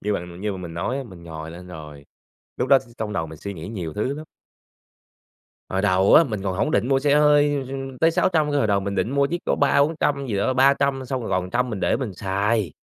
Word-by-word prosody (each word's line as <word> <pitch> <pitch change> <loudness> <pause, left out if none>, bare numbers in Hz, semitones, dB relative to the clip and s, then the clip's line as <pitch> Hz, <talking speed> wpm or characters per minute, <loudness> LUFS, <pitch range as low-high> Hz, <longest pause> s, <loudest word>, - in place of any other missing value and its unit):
như 105 +1 -1
bằng 90 -1 -5
như 105 -1 -2
mà 95 - -6
mình 85 -2 -7
nói 95 +10 -2
á, - - -3
mình 90 -6 -13
ngồi 80 -1 -8
lên 90 +2 -10
rồi, 75 -4 -10 0.5
lúc 125 - -1
đó 135 - +7
s - - -13 0.2
trong 105 -1 -3
đầu 80 -5 -2
mình 80 -1 -11
suy 100 +3 -6
nghĩ 80 +3 -8
nhiều 90 -8 -5
thứ 125 +6 -1
lắm. 155 +2 -8 1.4
Hồi 95 0 -1
đầu 95 -1 +4
á, 165 - +8
mình 105 -7 -4
còn 95 -2 -2
hổng 150 - 0
định 125 - +1
mua 135 -1 +3
xe 140 +1 +2
hơi, 145 -1 +4
ừm, 135 -1 -6
tới 165 +1 +4
600 160 -3 +1
cơ, 145 - +1
hồi 110 - +2
đầu 100 -1 +2
mình 100 +1 -3
định 95 +5 0
mua 140 0 +2
chiếc 175 +4 -3
có - - +1
300-400 140 0 +2
gì 105 -5 -2
đó, 130 +6 +1
300 135 0 +3
xong 130 +1 -3
rồi 115 - -5
còn 95 - +1
100 120 +7 -1
mình 105 -4 -4
để - - +2
mình 125 -8 -4
xài. 100 0 0
110 Hz, 255 wpm, -23 LUFS, 95-140 Hz, 1.4 s, á